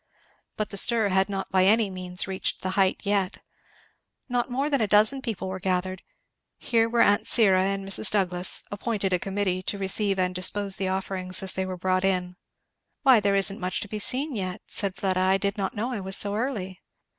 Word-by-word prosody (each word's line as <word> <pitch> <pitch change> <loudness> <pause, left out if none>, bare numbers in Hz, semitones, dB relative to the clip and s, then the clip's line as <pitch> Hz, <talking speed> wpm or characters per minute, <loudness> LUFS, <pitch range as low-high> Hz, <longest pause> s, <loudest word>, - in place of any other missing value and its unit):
But 215 - -3
the 200 - -5
stir 225 0 +2
had 190 +1 +1
not 195 -1 -5
by 185 -1 +3
any 215 0 +3
means 180 -1 -3
reached 190 -1 -3
the 185 - -2
height 190 -1 +1
yet. 200 -2 -1 0.9
Not 245 -1 -2
more 270 +4 -1
than 280 -4 0
a 215 - +1
dozen 215 +7 +4
people 225 -6 -5
were 190 0 -5
gathered. 185 0 -2 0.6
Here 230 -1 0
were 235 0 +3
aunt 205 +2 +2
Syra 190 -6 +5
and 195 0 -3
Mrs. 195 +2 +5
Douglass, 180 -3 +2
appointed 205 -2 -3
a 180 - +1
committee 190 -1 -2
to 200 - -4
receive 195 +1 0
and 180 -1 0
dispose 190 +2 -1
the 190 - -2
offerings 185 -1 -1
as 190 - 0
they 190 0 -3
were 185 -1 -6
brought 185 +1 -1
in. 180 -2 -1 0.7
"Why 260 -4 +6
there 200 -1 +1
is 195 0 +6
not 200 - -9
much 185 -1 -2
to - - -6
be 215 +1 -6
seen 265 +6 -1
yet," 185 -1 -5
said 195 -3 -3
Fleda. 185 -2 -1
"I 190 +1 +2
did 200 +1 -2
not 195 -3 -4
know 230 +5 -3
I 240 - -4
was 190 0 0
so 200 0 +1
early." 210 -6 -4
195 Hz, 210 wpm, -25 LUFS, 185-215 Hz, 0.9 s, Why